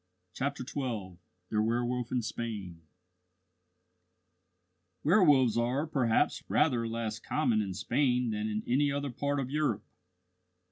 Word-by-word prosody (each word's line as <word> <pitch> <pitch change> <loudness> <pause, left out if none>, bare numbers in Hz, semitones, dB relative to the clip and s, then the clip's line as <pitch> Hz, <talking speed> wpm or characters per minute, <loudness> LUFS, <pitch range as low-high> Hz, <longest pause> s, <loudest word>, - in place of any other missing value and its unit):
CHAPTER 140 +2 -3
XII 115 -11 -4 0.3
THE 105 - +2
WERWOLF 120 +2 -1
IN 125 -2 0
SPAIN 105 -7 -5 2.2
Werwolves 145 - +5
are, 125 +6 0
perhaps, 135 -3 +1
rather 125 -7 +2
less 115 -1 -3
common 120 -8 +1
in 95 -3 -4
Spain 125 0 +1
than 105 0 -2
in 105 0 -2
any 140 +4 +2
other 140 -1 -2
part 140 +3 -1
of 130 -1 -3
Europe. 150 -8 0
120 Hz, 120 wpm, -31 LUFS, 110-140 Hz, 2.2 s, Werwolves